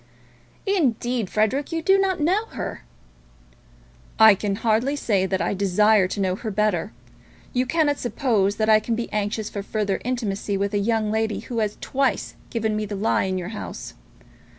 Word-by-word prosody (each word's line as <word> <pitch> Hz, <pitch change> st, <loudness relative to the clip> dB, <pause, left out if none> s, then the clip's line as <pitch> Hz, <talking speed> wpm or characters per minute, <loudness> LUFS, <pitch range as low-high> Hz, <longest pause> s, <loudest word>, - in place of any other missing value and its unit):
"Indeed, 250 Hz, -, 0 dB
Frederic, 240 Hz, +8 st, 0 dB
you 330 Hz, -1 st, -2 dB
do 390 Hz, +3 st, +4 dB
not 380 Hz, -2 st, +1 dB
know 370 Hz, +9 st, +2 dB
her." 455 Hz, -, -6 dB, 1.3 s
"I 220 Hz, -1 st, +9 dB
can 200 Hz, 0 st, -2 dB
hardly 230 Hz, +6 st, +1 dB
say 200 Hz, -9 st, +1 dB
that 190 Hz, 0 st, -1 dB
I -, -, 0 dB
desire 200 Hz, +1 st, +3 dB
to 200 Hz, -, -5 dB
know 185 Hz, -2 st, +1 dB
her 220 Hz, +3 st, -5 dB
better. 210 Hz, -4 st, 0 dB, 0.6 s
You 250 Hz, 0 st, +1 dB
cannot 290 Hz, 0 st, +1 dB
suppose 225 Hz, -6 st, +1 dB
that 215 Hz, 0 st, 0 dB
I 215 Hz, -1 st, +6 dB
can 225 Hz, +2 st, -2 dB
be 235 Hz, +1 st, -4 dB
anxious 210 Hz, +1 st, -1 dB
for 200 Hz, -, -5 dB
further 205 Hz, -1 st, -2 dB
intimacy 215 Hz, -5 st, -2 dB
with 200 Hz, +1 st, -1 dB
a 205 Hz, -, +2 dB
young 215 Hz, 0 st, 0 dB
lady 220 Hz, 0 st, -1 dB
who 235 Hz, -2 st, -4 dB
has 210 Hz, -1 st, -1 dB
twice 270 Hz, -1 st, -1 dB, 0.2 s
given 220 Hz, -2 st, -1 dB
me 215 Hz, 0 st, -1 dB
the 205 Hz, -, -4 dB
lie 200 Hz, +1 st, +1 dB
in 190 Hz, 0 st, -1 dB
your 180 Hz, 0 st, -4 dB
house. 215 Hz, -, -7 dB
215 Hz, 175 wpm, -23 LUFS, 200-250 Hz, 1.3 s, I